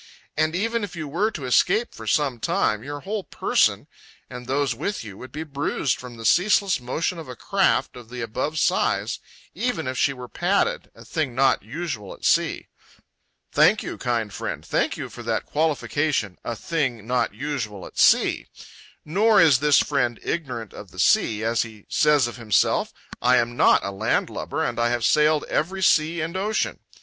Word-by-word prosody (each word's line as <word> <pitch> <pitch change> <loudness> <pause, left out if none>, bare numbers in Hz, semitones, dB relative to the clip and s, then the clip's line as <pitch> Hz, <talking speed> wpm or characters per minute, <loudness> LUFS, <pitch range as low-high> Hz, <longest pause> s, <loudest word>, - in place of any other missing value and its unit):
And 155 +2 +1
even 225 +4 0
if 195 -2 -6
you 155 -3 -5
were 175 +10 0
to 155 -11 -7
escape 215 - +2
for 115 - -10
some 135 -1 +1
time, 105 -1 0
your 145 +1 -6
whole 205 +1 -3
Person, - - +1 0.5
and 125 -1 -8
those 140 +1 +1
with 200 - -3
you 105 -3 -9
would 130 - -10
be 155 +2 -5
bruised 145 -2 -1
from 125 -2 -10
the 115 - -8
ceaseless 195 - +3
motion 160 +8 -2
of 160 - -9
a 125 - -7
craft - - +1
of 120 -2 -12
the 125 0 -6
above 130 +7 -3
size, - - +1 0.3
even 245 - -2
if 130 0 -3
she 140 - +3
were 125 -2 -8
padded, 200 - 0
a - - -14
thing 150 -7 -2
not 135 +1 +3
usual 115 - -5
at - - -10
sea." - - +2 0.9
Thank - - +4
you, - - -6
kind 115 -4 -1
friend, - - -5
thank - - 0
you - - -5
for - - -10
that - - -2
qualification, 145 - -1
"a 120 - -3
thing 125 -5 -2
not 125 +1 0
usual 115 -10 -4
at - - -9
sea." - - +4 0.6
Nor 205 +7 +4
is 155 -6 +6
this 150 0 +4
friend 125 -5 0
ignorant 125 -10 -4
of 105 - -10
the 90 - -17
sea. 105 +3 +3
As 115 +1 +1
he 110 -3 -8
says 150 -4 +4
of 120 - -6
himself, 115 -3 +1 0.3
"I 125 +1 +4
am 120 0 0
not - - +4
a 100 - -3
land 95 - 0
lubber, - - -3
and - - -2
I 120 0 +2
have 120 -1 0
sailed 150 0 +3
every 190 +5 -2
sea 160 0 +3
and 165 +3 -4
ocean." 210 +3 -1
140 Hz, 185 wpm, -24 LUFS, 120-160 Hz, 0.9 s, is